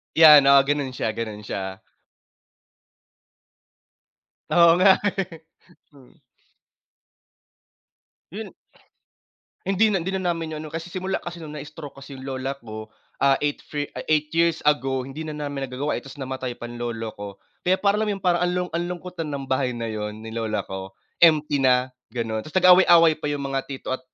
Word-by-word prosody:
'Yan 150 Hz, -3 st, +9 dB
oo 140 Hz, 0 st, +8 dB
ganun 140 Hz, -2 st, -1 dB
siya, 110 Hz, -, -1 dB
ganun 110 Hz, -1 st, -5 dB
siya. 95 Hz, -2 st, -5 dB, 2.7 s
Oo 170 Hz, -1 st, +6 dB
nga 190 Hz, +2 st, +7 dB, 0.2 s
eh. 180 Hz, -4 st, -4 dB, 0.5 s
Hmm. 135 Hz, -4 st, -19 dB, 2.2 s
Yun -, -, -6 dB, 1.2 s
Hindi 210 Hz, +3 st, +3 dB
na 195 Hz, -, +2 dB
hindi 190 Hz, +3 st, -3 dB
na 180 Hz, -2 st, 0 dB
namin 165 Hz, -2 st, -5 dB
'yun 155 Hz, -, -6 dB
ano 155 Hz, -, -9 dB
kasi 165 Hz, +1 st, -5 dB
simula 185 Hz, +2 st, -3 dB
kasi 175 Hz, -1 st, -8 dB
nung 155 Hz, -2 st, -8 dB
na-stroke 150 Hz, -1 st, -8 dB
kasi 140 Hz, 0 st, -10 dB
yung 130 Hz, -, -10 dB
lola 135 Hz, 0 st, -4 dB
ko, 110 Hz, -4 st, -9 dB, 0.3 s
ah, 135 Hz, -1 st, +4 dB
8 145 Hz, -1 st, -1 dB
fre 145 Hz, -1 st, -4 dB
ah, -, -, -6 dB
8 150 Hz, -1 st, +1 dB
years 165 Hz, 0 st, +2 dB
ago 135 Hz, -3 st, +1 dB
hindi 145 Hz, +4 st, -7 dB
na 150 Hz, -, -5 dB
namin 145 Hz, -2 st, -4 dB
nagagawa 135 Hz, +4 st, -3 dB
eh -, -, -8 dB
tapos 135 Hz, +1 st, -12 dB
namatay 130 Hz, -2 st, -5 dB
pa -, -, -10 dB
lolo 120 Hz, -2 st, -4 dB
ko, 100 Hz, 0 st, -7 dB, 0.4 s
kaya 185 Hz, +1 st, +4 dB
para 200 Hz, +1 st, +2 dB
alam 220 Hz, -, 0 dB
yung 200 Hz, -2 st, -3 dB
parang 175 Hz, -2 st, +2 dB
ang 180 Hz, 0 st, +1 dB
lung 180 Hz, 0 st, -2 dB
ang 170 Hz, +1 st, -1 dB
lungkot 180 Hz, 0 st, -7 dB
na 150 Hz, -3 st, -3 dB
ng 135 Hz, -, -6 dB
bahay 130 Hz, -2 st, 0 dB
na 115 Hz, -1 st, -3 dB
'yun 105 Hz, 0 st, -5 dB
ni 110 Hz, -, -7 dB
lola 110 Hz, -3 st, -2 dB
ko, 95 Hz, 0 st, -7 dB, 0.3 s
empty 150 Hz, -4 st, +4 dB
na 130 Hz, -1 st, +3 dB, 0.2 s
ganun 115 Hz, -3 st, -3 dB
tapos 155 Hz, +10 st, -9 dB
nag-aaway-away 175 Hz, -3 st, +7 dB
pa -, -, -4 dB
'yung 145 Hz, -1 st, -2 dB
mga 135 Hz, 0 st, -1 dB
tito 135 Hz, -2 st, -5 dB
at 130 Hz, -, -2 dB
145 Hz, 175 wpm, -24 LUFS, 125-170 Hz, 2.7 s, Yan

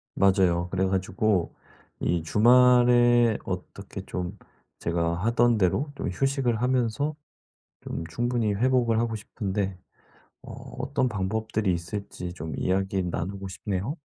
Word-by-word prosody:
맞아요. 90 Hz, -3 st, +3 dB
그래 95 Hz, +1 st, 0 dB
가지고 95 Hz, 0 st, 0 dB, 0.4 s
이 85 Hz, -1 st, 0 dB
주말에 120 Hz, +3 st, +5 dB
어떻게 95 Hz, +1 st, -6 dB
좀 90 Hz, +2 st, -5 dB, 0.4 s
제가 85 Hz, 0 st, 0 dB
하던 120 Hz, +1 st, +3 dB
대로 110 Hz, -, +1 dB
좀 -, -, -4 dB
휴식을 130 Hz, +1 st, 0 dB
하면서 130 Hz, +4 st, 0 dB, 0.7 s
좀 80 Hz, -, -5 dB
충분히 120 Hz, +4 st, 0 dB
회복을 120 Hz, 0 st, +2 dB
하고 115 Hz, -1 st, -1 dB
싶은데 100 Hz, -2 st, -3 dB, 0.7 s
어 -, -, -9 dB, 0.3 s
어떤 130 Hz, 0 st, 0 dB
방법들이 110 Hz, 0 st, -1 dB
있을지 90 Hz, +1 st, -5 dB
좀 80 Hz, -2 st, -6 dB
이야기 95 Hz, +1 st, 0 dB
나누고 95 Hz, +2 st, -4 dB
싶네요. 95 Hz, -, -3 dB
105 Hz, 260 characters per minute, -26 LUFS, 95-120 Hz, 0.7 s, 주말에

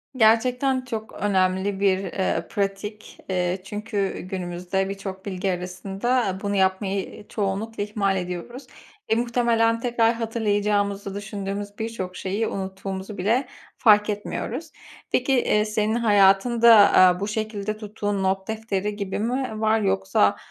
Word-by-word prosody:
Gerçekten 250 Hz, +3 st, +3 dB
çok 220 Hz, -3 st, -5 dB
önemli 190 Hz, 0 st, 0 dB
bir, 195 Hz, -2 st, +3 dB
eee, 190 Hz, +1 st, -2 dB
pratik. 205 Hz, +1 st, -4 dB
Eee, 180 Hz, 0 st, 0 dB
çünkü 205 Hz, -1 st, -3 dB
günümüzde 185 Hz, +1 st, -3 dB
birçok 195 Hz, -1 st, -6 dB
bilgi 190 Hz, -1 st, -2 dB
arasında 195 Hz, +4 st, -1 dB
bunu 200 Hz, 0 st, -1 dB
yapmayı 190 Hz, +1 st, -1 dB
çoğunlukla 205 Hz, +1 st, -2 dB
ihmal 200 Hz, -2 st, 0 dB
ediyoruz. 180 Hz, +9 st, -6 dB, 0.4 s
Eee, 220 Hz, -, +3 dB
muhtemelen 235 Hz, -1 st, +2 dB
tekrar 235 Hz, -1 st, +2 dB
hatırlayacağımızı 205 Hz, -3 st, -1 dB
düşündüğümüz 205 Hz, 0 st, -5 dB
birçok 205 Hz, -5 st, -4 dB
şeyi 205 Hz, +4 st, -2 dB
unuttuğumuzu 190 Hz, +1 st, -5 dB
bile 235 Hz, +8 st, +1 dB, 0.3 s
fark 210 Hz, -2 st, +5 dB
etmiyoruz. 250 Hz, +9 st, -4 dB, 0.4 s
Peki, 260 Hz, +2 st, +2 dB
eee, 210 Hz, -4 st, +2 dB
senin 215 Hz, +1 st, 0 dB
hayatında, 225 Hz, +2 st, +5 dB
aaa, 185 Hz, -3 st, +6 dB
bu 200 Hz, -, -2 dB
şekilde 215 Hz, -1 st, -3 dB
tuttuğun 205 Hz, -2 st, -3 dB
not 190 Hz, 0 st, 0 dB
defteri 210 Hz, -2 st, -2 dB
gibi 200 Hz, -1 st, -3 dB
mi 250 Hz, +3 st, -1 dB
v -, -, -6 dB
var? 220 Hz, 0 st, +3 dB
Yoksa, 95 Hz, -, +2 dB
205 Hz, 125 wpm, -24 LUFS, 190-225 Hz, 0.4 s, aaa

